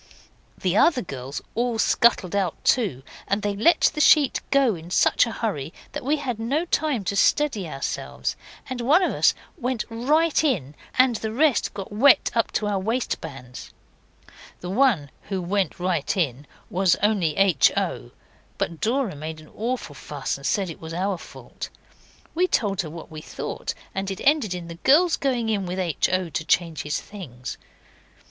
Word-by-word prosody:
The 185 0 0
other 260 +3 +4
girls 135 -4 -6
all 240 0 0
scuttled 220 -5 +3
out 190 -5 0
too, 195 - +1 0.2
and 200 +1 0
they 205 -1 -1
let 225 +12 +4
the 300 - -1
sheet 290 -2 +5
go 275 -5 +4
in 165 -1 -9
such 185 - +3
a - - -4
hurry 165 - -3 0.2
that - - -5
we 290 +4 +1
had 255 -6 -3
no 275 +9 0
time 300 - 0
to 195 +2 -2
steady 215 - +2
ourselves, 135 -2 -3 0.3
and 255 -2 -4
one 300 +10 +4
of - - +1
us - - +3 0.2
went 250 -3 -1
right 300 +8 +2
in, 180 - 0 0.2
and 255 -3 +4
the 220 0 -4
rest 265 -3 +2
got 195 -1 -6
wet 250 +6 +5
up 230 -1 +1
to 215 - 0
our 205 -2 0
waistbands. 160 - -4 0.9
The 180 - -5
one 200 - +2 0.2
who 195 -2 -1
went 185 0 -1
right 180 -2 -1
in 145 -5 -1 0.2
was 185 -1 +3
only 195 -8 +2
H. 190 -8 +5
O.; - - -2 0.5
but 165 -2 -3
Dora 235 - 0
made 155 +2 -6
an 155 - -15
awful 240 +4 -3
fuss - - -4
and - - -5
said 195 -5 0
it - - -12
was 160 0 -6
our 190 0 -1
fault. - - -9 0.6
We 360 +3 +2
told 200 - +1
her 160 - -7
what 165 +1 -10
we 155 -1 -7
thought, - - -5 0.2
and 195 0 -3
it 195 0 -5
ended 275 - +2
in 175 -1 -6
the 170 0 -9
girls 330 +5 +5
going 245 -5 -1
in 200 -4 0
with 180 +1 -4
H. 175 -5 0
O. 185 -1 0
to 160 - -3
change 165 -4 +1
his 150 +1 -2
things. 130 - -8
200 Hz, 180 wpm, -24 LUFS, 170-250 Hz, 0.9 s, sheet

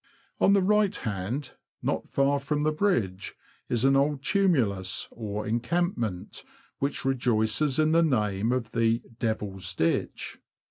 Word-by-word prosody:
On 200 - +5
the 200 -2 +4
right 210 0 +3
hand, 110 +7 -4 0.3
not - - -2
far 140 +1 +2
from 145 +2 -1
the 155 - +2
bridge, 120 - -1 0.3
is 120 +1 +1
an 135 0 +5
old 140 0 +1
tumulus, 125 - +1
or 105 -2 -5
encampment, 120 - -2 0.4
which 140 -1 -2
rejoices 125 +1 +1
in 155 0 +3
the 165 +1 +5
name 110 -7 +1
of 125 -2 -2
the 115 0 +1
" 115 0 -23
Devil's 100 -5 -3
Ditch." 85 -1 -1
125 Hz, 140 wpm, -27 LUFS, 110-150 Hz, 0.4 s, On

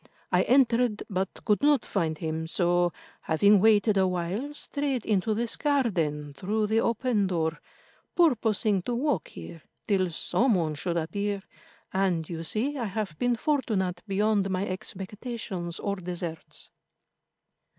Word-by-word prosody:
I - - +4
entered, 245 -4 +3
but 190 0 0 0.2
could 210 - +2
not 290 -3 +3
find 160 -5 -1
him, 160 0 -3
so, 175 0 +2 0.3
having 200 +6 +4
waited 210 0 +4
a 190 -1 +4
while, 185 +10 -2
strayed 280 -5 -2
into 215 +1 +1
this 235 +1 0
garden 170 - 0
through 210 +9 -1
the 220 +2 +2
open 230 -3 +1
door, 165 -3 -1 0.6
purposing 220 - +3
to 240 +6 -2
walk 255 - 0
here 85 - -10 0.3
till 190 -4 +2
some 230 +8 +1
one 160 -4 0
should 170 +3 -2
appear, 200 +5 -2 0.5
and, 185 -4 +1
you 165 -2 -5
see, 255 - -1
I 235 - -1
have 200 -5 -3
been 245 -1 +2
fortunate 215 - 0
beyond 200 0 +1
my 190 +1 -1
expectations 190 -1 -5
or 200 -1 -2
deserts." 175 -3 -6
200 Hz, 140 wpm, -27 LUFS, 175-230 Hz, 0.6 s, I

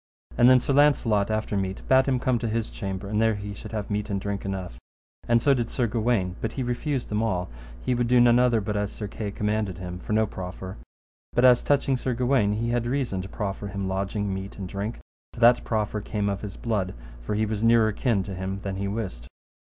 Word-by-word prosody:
And 120 +1 +6
then 130 0 +7
Sir 135 - -1
Launcelot 125 -8 +3
after 110 -1 -1
meat 95 -1 -3
bade 130 +1 +5
him 130 -2 +2
come 125 -1 +1
to 115 - -2
his 115 0 -2
chamber, 95 0 -5
and 105 +2 0
there 110 -1 +3
he 100 0 -6
should - - -9
have 105 -2 -4
meat 105 +1 -1
and 100 -1 -1
drink 100 0 -4
enough. 95 -10 -5 0.5
And 120 -1 +3
so 140 - +5
did 120 -3 -1
Sir 125 - 0
Gawaine: 110 -5 0
but 110 - -2
he 130 - -2
refused 125 +2 -2
them 105 0 0
all; 95 - -1 0.3
he 125 - +1
would 120 -1 +1
do 125 +1 +5
none 120 0 +6
other 120 -3 +3
but 105 +1 -3
as 105 0 -1
Sir 105 - -5
Kay 105 +1 -5
commanded 105 -2 -1
him, 90 0 -6
for 105 - -4
no 110 +1 +4
proffer. 95 -1 -7 0.6
But 120 - +4
as 125 -1 +7
touching 140 -2 +2
Sir 125 -1 -2
Gawaine, 120 -4 +2
he 115 +2 -1
had 120 0 0
reason 120 -7 -1
to 95 - -8
proffer 100 0 -4
him 100 -1 -3
lodging, 100 +1 -2
meat, 95 +1 -6
and 95 -2 -5
drink, 100 +5 -4 0.4
for - - -10
that 120 +1 +6
proffer 105 -1 -1
came 105 0 -1
of 100 -1 -3
his 105 -2 -7
blood, 105 - -2 0.3
for 105 - -3
he 110 +1 +1
was 105 -1 -3
nearer 115 -1 +5
kin 105 -2 0
to 100 - -6
him 95 +1 -4
than 95 -1 -3
he 100 0 -2
wist. 95 - -4
105 Hz, 235 wpm, -26 LUFS, 100-120 Hz, 0.6 s, then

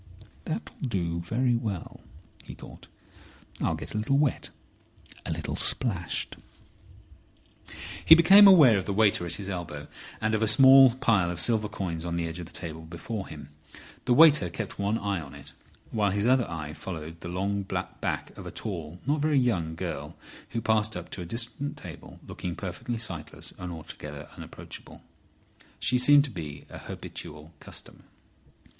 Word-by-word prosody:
"That'll - - -5
do 85 -9 -2
very 120 +8 0
well," 105 -7 -4 0.4
he - - -10
thought. - - -13 0.7
"I'll - - +1
get - - -8
a 110 - -1
little 135 +6 +1
wet, 145 -3 0 0.8
a - - -2
little - - -3
splashed—" 95 -10 +1 1.7
He 160 - +9
became 195 +5 +8
aware 145 - +7
of 95 - -5
the 100 - -2
waiter 105 -4 +3
at 85 - -2
his 100 -2 -5
elbow 85 -6 -5 0.3
and 110 0 0
of 110 - +1
a 110 - +2
small 130 +2 +8
pile 110 -9 +2
of 90 -1 -4
silver 110 +2 +2
coins 85 -4 -4
on 85 -1 -3
the 85 -1 -1
edge 80 +2 -6
of 85 - -7
the - - -13
table 80 -1 -5
before 90 +6 -6
him. 75 -2 -10 0.6
The 125 - +3
waiter 155 - +6
kept 85 - -6
one 100 +2 0
eye 100 -5 -2
on 70 -3 -11
it, - - -11 0.4
while 105 -2 +1
his 100 +2 -1
other 125 -2 +3
eye 80 -2 -5
followed 80 -1 -7
the 85 - -7
long 100 +3 -1
back 95 - -4
of - - -9
a - - -6
tall, 85 -5 -6
not 145 +2 +1
very 150 -1 +2
young 90 -11 +1
girl, - - -5 0.3
who 115 - -3
passed 110 -2 +1
up 90 0 -9
to 95 - -5
a - - -5
distant 115 +7 -5
table - - -11
looking 90 -2 -5
perfectly 115 +6 -5
sightless 95 -9 -5
and 90 -1 -5
altogether 75 -2 -9
unapproachable. - - -11 0.8
She 125 0 +2
seemed 145 +3 +7
to 140 - -6
be 75 -7 -7
a - - -8
habitual 75 +2 -9
customer. - - -9
100 Hz, 170 wpm, -27 LUFS, 85-120 Hz, 1.7 s, He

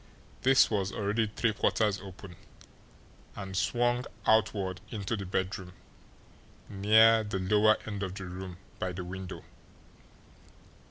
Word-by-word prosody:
This 135 -1 +5
was 100 -2 0
already 105 +3 0
three 110 +1 0
quarters 105 -2 +1
open, 95 -1 -11 1.0
and 95 -2 -6
swung 120 +5 +1 0.2
outward 100 -4 +2
into 105 0 -3
the 100 -3 -6
bedroom, 95 0 -3 0.9
near 110 +3 +5
the 105 -2 -3
lower 105 +3 +4
end 105 -2 -5
of 95 -1 -4
the 95 - -6
room 90 0 -7 0.2
by 95 -1 -2
the 90 0 -5
window. 95 +1 -7
100 Hz, 120 wpm, -30 LUFS, 95-110 Hz, 1.0 s, This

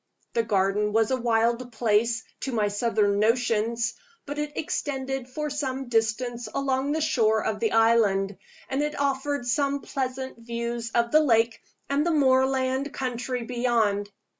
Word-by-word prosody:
The 230 - +2
garden 210 -1 +1
was 225 +2 +2
a 260 -1 0
wild 235 +1 +1
place, 225 +1 +1 0.2
to 265 - -3
my 215 -3 +1
southern 205 -1 +1
notions; 230 +1 +1 0.3
but 290 +1 -5
it 295 0 -3
extended 270 -4 -3
for 300 +3 -4
some 270 -3 -3
distance 235 +1 0
along 275 +1 0
the 315 - -1
shore 220 -8 +2
of 210 -1 -1
the 225 - +1
island, 215 -4 +3 0.3
and 270 +2 -1
it 300 -1 -2
offered 280 -1 -1
some 280 +2 0
pleasant 260 -1 -4
views 235 0 -4
of 235 0 +2
the 310 - +6
lake 230 -5 +2 0.3
and 280 +1 +1
the 345 - +1
moorland 265 -2 +2
country 250 -1 -3
beyond. 230 -4 0
240 Hz, 150 wpm, -26 LUFS, 225-270 Hz, 0.3 s, the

